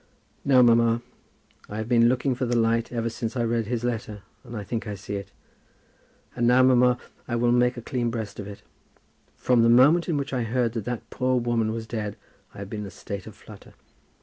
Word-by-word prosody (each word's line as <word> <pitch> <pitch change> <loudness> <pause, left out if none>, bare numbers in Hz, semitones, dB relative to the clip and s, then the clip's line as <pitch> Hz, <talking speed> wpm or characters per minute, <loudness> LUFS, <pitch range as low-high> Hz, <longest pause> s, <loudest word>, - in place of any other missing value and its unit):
"No, 130 -2 +5
mamma, 115 -1 +5
no. 115 - -4 0.7
I 105 - -6
have 110 0 -3
been 120 -1 +4
looking 130 +1 +1
for 125 0 -2
the 120 - 0
light 115 0 +1
ever 115 -1 -2
since 115 +2 -4
I 120 - +1
read 115 -1 0
his 120 0 -2
letter, 110 -4 -4 0.2
and 115 - -8
I 105 - -5
think 110 +3 -4
I 105 - -4
see 100 +1 -8
it. 100 0 -6 1.0
And 120 - +1
now, 125 +1 +5
mamma, 125 -1 +4 0.3
I 120 - -2
will 120 0 +2
make 125 +1 +2
a 120 - -7
clean 120 -1 -1
breast 110 -3 -5
of 100 - -6
it. 100 -1 -10 0.7
From 125 -2 +3
the 115 - +4
moment 145 +9 +5
in 160 - +1
which 140 -1 -4
I 125 - 0
heard 115 0 0
that 115 -4 -4
that 120 -2 -4
poor 130 0 +1
woman 115 -2 0
was 115 0 -4
dead, 110 -2 -4 0.4
I - - -12
have 100 0 -6
been 105 - -4
in 105 - -5
a - - -8
state 100 0 -7
of - - -10
flutter. - - -15
115 Hz, 230 wpm, -25 LUFS, 110-125 Hz, 1.0 s, No